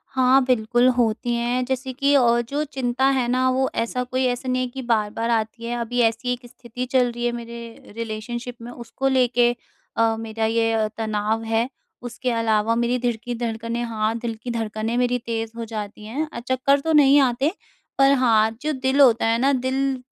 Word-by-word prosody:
हाँ, 260 Hz, +1 st, +5 dB
बिल्कुल 240 Hz, 0 st, +2 dB
होती 240 Hz, 0 st, +1 dB
हैं। 240 Hz, +2 st, 0 dB
जैसे 260 Hz, 0 st, -3 dB
कि 280 Hz, +2 st, +1 dB
अ, 240 Hz, -3 st, +4 dB
जो 290 Hz, +2 st, -1 dB
चिंता 265 Hz, -3 st, -1 dB
है 250 Hz, -2 st, 0 dB
ना 255 Hz, +1 st, +2 dB
वो 265 Hz, +1 st, +1 dB
ऐसा 250 Hz, +2 st, -3 dB
कोई 255 Hz, +1 st, -1 dB
ऐसा 250 Hz, +1 st, -2 dB
नहीं 255 Hz, 0 st, +1 dB
है 255 Hz, -, -1 dB
कि 265 Hz, +2 st, -7 dB
बार-बार 225 Hz, -1 st, -1 dB
आती 230 Hz, 0 st, -1 dB
है। 240 Hz, +1 st, -2 dB
अभी 240 Hz, +1 st, -2 dB
ऐसी 230 Hz, +2 st, +1 dB
एक 245 Hz, 0 st, -9 dB
स्थिति 245 Hz, +1 st, -7 dB
चल 250 Hz, -2 st, +3 dB
रही 240 Hz, 0 st, -4 dB
है, 240 Hz, -, +1 dB
मेरे 235 Hz, -2 st, -9 dB
रिलेशनशिप 230 Hz, +2 st, -5 dB
में 235 Hz, +1 st, -8 dB
उसको 245 Hz, +2 st, -4 dB
लेके 245 Hz, -2 st, +3 dB, 0.4 s
अ, 225 Hz, 0 st, +3 dB
मेरा 225 Hz, 0 st, -3 dB
ये 225 Hz, 0 st, +1 dB
अ, 220 Hz, -1 st, +1 dB
तनाव 220 Hz, 0 st, -1 dB
है। 225 Hz, +1 st, 0 dB, 0.4 s
उसके 245 Hz, +1 st, -3 dB
अलावा 225 Hz, -1 st, +1 dB
मेरी 240 Hz, +1 st, +1 dB
दिल 240 Hz, -1 st, 0 dB
की 245 Hz, 0 st, -4 dB
धड़कनें 230 Hz, 0 st, -3 dB
हाँ। 220 Hz, -1 st, -1 dB
दिल 230 Hz, -1 st, -4 dB
की 245 Hz, -, -3 dB
धड़कनें 225 Hz, 0 st, -3 dB
मेरी 245 Hz, 0 st, +2 dB
तेज़ 225 Hz, -1 st, -3 dB
हो 230 Hz, -, -4 dB
जाती 215 Hz, -1 st, -7 dB
हैं। 280 Hz, +9 st, -3 dB
अ, -, -, -5 dB
चक्कर 260 Hz, +3 st, +1 dB
तो 320 Hz, +3 st, -1 dB
नहीं 285 Hz, -1 st, +6 dB
आते, 265 Hz, +3 st, +1 dB, 0.5 s
पर 275 Hz, 0 st, +5 dB
हाँ 220 Hz, -2 st, +3 dB
जो 305 Hz, +1 st, -1 dB
दिल 265 Hz, +1 st, 0 dB
होता 240 Hz, -4 st, +5 dB
है 230 Hz, 0 st, +2 dB
ना, 275 Hz, +3 st, +3 dB
दिल 260 Hz, 0 st, -1 dB
240 Hz, 200 wpm, -23 LUFS, 225-255 Hz, 0.5 s, नहीं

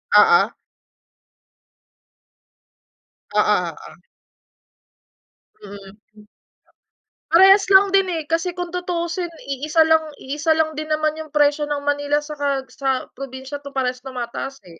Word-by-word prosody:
Oo. 455 Hz, 0 st, +6 dB, 2.9 s
Oo -, -, +5 dB
oo. -, -, -2 dB, 1.7 s
Mm, 200 Hz, 0 st, -12 dB, 0.2 s
hm 210 Hz, 0 st, -18 dB, 1.0 s
Parehas 385 Hz, +3 st, +6 dB
lang 390 Hz, 0 st, +6 dB
din 390 Hz, -1 st, +3 dB
eh, 330 Hz, -3 st, -3 dB
kasi 330 Hz, +3 st, -2 dB
kung 355 Hz, -1 st, -5 dB
tutusin 355 Hz, 0 st, -3 dB, 0.2 s
iisa 300 Hz, +4 st, +2 dB
lang 315 Hz, -2 st, +1 dB
iisa 295 Hz, +4 st, -1 dB
lang 315 Hz, 0 st, +1 dB
din 310 Hz, -, -5 dB
naman 310 Hz, 0 st, 0 dB
yung 315 Hz, -, -7 dB
presyo 295 Hz, 0 st, +2 dB
ng 290 Hz, -1 st, -3 dB
Manila 290 Hz, +1 st, 0 dB
saka 285 Hz, -3 st, -2 dB
sa 265 Hz, -2 st, -1 dB
probinsya 265 Hz, +1 st, -8 dB
tu 280 Hz, 0 st, -10 dB
parehas 255 Hz, -1 st, -1 dB
tumataas 265 Hz, +1 st, -7 dB
eh. 170 Hz, -2 st, -16 dB
295 Hz, 120 wpm, -21 LUFS, 270-335 Hz, 2.9 s, Oo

